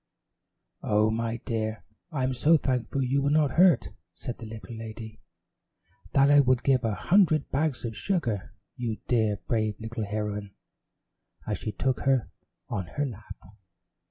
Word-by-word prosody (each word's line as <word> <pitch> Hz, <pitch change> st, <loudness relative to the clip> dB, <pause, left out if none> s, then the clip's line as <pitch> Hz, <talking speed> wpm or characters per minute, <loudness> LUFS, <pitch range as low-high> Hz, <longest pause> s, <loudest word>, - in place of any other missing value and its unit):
"Oh, 105 Hz, +1 st, +2 dB
my 115 Hz, +1 st, -1 dB
dear, 110 Hz, -1 st, -2 dB, 0.3 s
I'm 130 Hz, -4 st, 0 dB
so 150 Hz, +6 st, +4 dB
thankful 130 Hz, 0 st, -1 dB
you 135 Hz, +2 st, +1 dB
were 140 Hz, -, +1 dB
not 150 Hz, -2 st, +3 dB
hurt," 170 Hz, -5 st, +5 dB, 0.3 s
said 125 Hz, -, -6 dB
the 115 Hz, -, -7 dB
little 110 Hz, +1 st, -8 dB
lady, 110 Hz, 0 st, -8 dB, 0.9 s
"that 140 Hz, +1 st, +5 dB
I 145 Hz, -, +7 dB
would 130 Hz, -3 st, +3 dB
give 130 Hz, -2 st, +3 dB
a 110 Hz, -2 st, 0 dB
hundred 170 Hz, -, +3 dB
bags 140 Hz, -3 st, 0 dB
of 115 Hz, -2 st, -4 dB
sugar 120 Hz, -, -2 dB, 0.2 s
you, 115 Hz, -3 st, -3 dB
dear 110 Hz, -4 st, +2 dB
brave 110 Hz, -3 st, 0 dB
little 110 Hz, 0 st, -4 dB
heroine," 105 Hz, -1 st, -4 dB, 0.9 s
as -, -, -2 dB
she 110 Hz, -, -3 dB
took 125 Hz, +6 st, -1 dB
her 135 Hz, -3 st, +1 dB, 0.4 s
on 95 Hz, -4 st, -3 dB
her 145 Hz, -, +1 dB
lap. 110 Hz, -5 st, -8 dB
120 Hz, 150 wpm, -27 LUFS, 110-135 Hz, 0.9 s, I